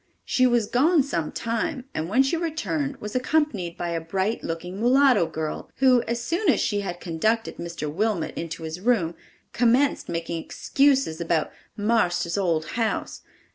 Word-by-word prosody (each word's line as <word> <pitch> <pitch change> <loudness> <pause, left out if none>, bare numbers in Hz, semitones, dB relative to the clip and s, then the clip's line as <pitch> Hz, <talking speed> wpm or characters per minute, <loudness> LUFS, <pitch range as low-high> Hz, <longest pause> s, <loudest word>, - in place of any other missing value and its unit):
She 255 0 +3
was 240 -3 +2
gone 295 - +3
some 170 - -2
time, 250 +4 -2
and 160 +2 -3
when 255 +7 +4
she 270 +5 0
returned 320 -4 -2
was 210 +2 -7
accompanied 250 - 0
by 175 - -3
a 165 -1 -2
bright 190 +6 -2
looking 180 +3 -5
mulatto 250 -5 +4
girl, 155 -1 -5
who, 255 -2 +5
as 235 +1 -1
soon 335 - 0
as 260 - +4
she 205 - 0
had 175 -3 -4
conducted 215 +8 -1
Mr. 170 -3 -5
Wilmot 185 +2 -1
into 165 0 -5
his 160 +2 -5
room, 195 -6 +1 0.4
commenced 250 +4 +2
making 165 0 -3
excuses 270 - +1
about 165 -2 0 0.3
"marster's 180 -6 +1
old 170 -6 +1 0.2
house! 220 - -2
215 Hz, 160 wpm, -25 LUFS, 170-260 Hz, 0.4 s, who